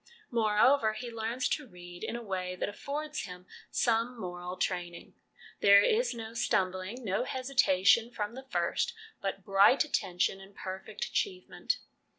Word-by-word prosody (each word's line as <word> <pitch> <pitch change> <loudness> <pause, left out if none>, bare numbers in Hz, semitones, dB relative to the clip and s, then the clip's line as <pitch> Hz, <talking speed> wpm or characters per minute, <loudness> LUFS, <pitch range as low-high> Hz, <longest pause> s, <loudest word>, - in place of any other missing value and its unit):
Moreover, 220 +1 +4
he 235 +2 -6
learns 230 +3 -1
to 295 -3 -2
read 175 -3 -11
in - - -3
a 240 - -5
way 185 -3 -3
that - - -2
affords 300 +8 -4
him 180 -1 -10 0.2
some 235 +1 +1
moral 180 -1 -5
training. 175 -2 -3 0.5
There 200 0 +7
is 475 +3 +2
no 225 -1 -7
stumbling, 190 0 -1
no 195 +3 0
hesitation 235 -5 +3
from 210 -2 -4
the 265 +2 -10
first, 480 - 0 0.3
but 195 0 -3
bright 200 +7 +6
attention 195 -8 0
and 195 +1 -15
perfect 190 0 -5
achievement. 375 -3 -2
215 Hz, 145 wpm, -31 LUFS, 185-250 Hz, 0.5 s, There